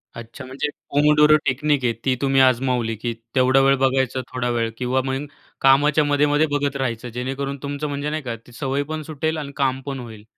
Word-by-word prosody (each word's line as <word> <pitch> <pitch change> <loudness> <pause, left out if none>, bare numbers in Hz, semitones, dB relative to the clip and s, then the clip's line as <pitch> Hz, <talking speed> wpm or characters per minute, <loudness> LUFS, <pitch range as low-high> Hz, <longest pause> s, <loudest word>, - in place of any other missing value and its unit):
अच्छा, 115 +3 -9
म्हणजे 135 +3 -3 0.2
pomodoro 150 +1 +5
technique 140 +1 +1
आहे, 115 - +2
ती 130 - +2
तुम्ही 135 -1 +3
आजमावली. 125 -3 +2
की 115 +2 -3 0.2
तेवढा 130 +1 +4
वेळ 135 0 +4
बघायचा 130 -1 +1
थोडा 125 -1 -2
वेळ 115 -1 0
किंवा 130 +1 0
मग 135 +2 -2 0.4
कामाच्या 145 +3 +4
मध्ये-मध्ये 145 +1 +2
बघत 140 -1 -2
राहायचं 125 -3 -3
जेणेकरून 135 +3 -4
तुमचं 145 +1 -3
म्हणजे 145 +1 -3
नाही 155 0 -3
का 120 -2 -4
ती - - -15
सवय 135 +3 -2
पण 155 0 -3
सुटेल 155 +1 -3
आणि 145 -2 -5
काम 135 -1 0
पण 135 -2 -4
होईल 110 -3 -10
135 Hz, 190 wpm, -22 LUFS, 125-145 Hz, 0.4 s, pomodoro